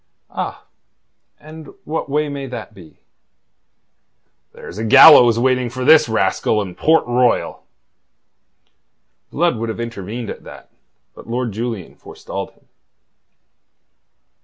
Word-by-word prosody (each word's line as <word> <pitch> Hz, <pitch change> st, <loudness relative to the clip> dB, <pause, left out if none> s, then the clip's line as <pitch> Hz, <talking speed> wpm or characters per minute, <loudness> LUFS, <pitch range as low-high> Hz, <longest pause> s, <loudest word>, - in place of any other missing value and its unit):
"Ah! -, -, -6 dB, 0.7 s
And 155 Hz, -1 st, -13 dB
what 155 Hz, -1 st, -5 dB
way 150 Hz, +2 st, 0 dB
may 140 Hz, -1 st, -6 dB
that 125 Hz, -3 st, -8 dB
be?" 85 Hz, -6 st, -17 dB, 1.5 s
"There's 100 Hz, -, -11 dB
a -, -, -3 dB
gallows 125 Hz, -1 st, +7 dB
waiting 125 Hz, 0 st, 0 dB
for 130 Hz, +2 st, -5 dB
this 155 Hz, -4 st, +5 dB
rascal 110 Hz, 0 st, 0 dB
in 95 Hz, -4 st, -5 dB
Port 160 Hz, -, +2 dB
Royal." 120 Hz, 0 st, -1 dB, 1.6 s
Blood 170 Hz, -4 st, 0 dB
would 115 Hz, +1 st, -4 dB
have 110 Hz, -, -6 dB
intervened 115 Hz, 0 st, -6 dB
at -, -, -11 dB
that, -, -, -14 dB, 0.4 s
but -, -, -15 dB
Lord 120 Hz, 0 st, -3 dB
Julian 110 Hz, -3 st, -6 dB
forestalled -, -, -8 dB
him. -, -, -33 dB
120 Hz, 115 wpm, -18 LUFS, 110-140 Hz, 1.6 s, gallows